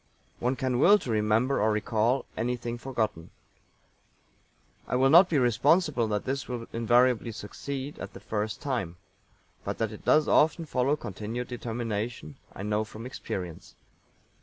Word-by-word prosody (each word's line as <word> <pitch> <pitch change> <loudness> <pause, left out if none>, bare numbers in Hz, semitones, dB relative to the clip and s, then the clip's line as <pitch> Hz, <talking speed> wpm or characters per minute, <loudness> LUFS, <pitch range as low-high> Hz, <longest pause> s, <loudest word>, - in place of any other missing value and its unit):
One 125 +2 0
can 130 -3 -1
will 200 +9 +7
to 130 - -5
remember 110 +5 +2
or 110 +1 +3
recall 110 +4 +1
anything 120 0 -3
forgotten. 110 -10 -3 1.6
I - - -1
will 135 +2 +4
not 175 +3 +8
be 155 - +2
responsible 135 +2 +3
that 105 -1 -2
this 135 0 -2
will 120 -2 -4
invariably 120 +1 +3
succeed 135 +6 -6
at - - -7
the - - -9
first 105 -1 -3
time, 110 -12 -2 0.7
but - - -3
that 110 -1 -1
it 105 - -10
does 155 0 +4
often 160 +2 +3
follow 135 0 +1
continued 115 0 -5
determination 115 - -4
I 100 - -8
know 105 +1 0
from 110 +1 -9
experience. 90 -9 -6
120 Hz, 145 wpm, -28 LUFS, 110-135 Hz, 1.6 s, not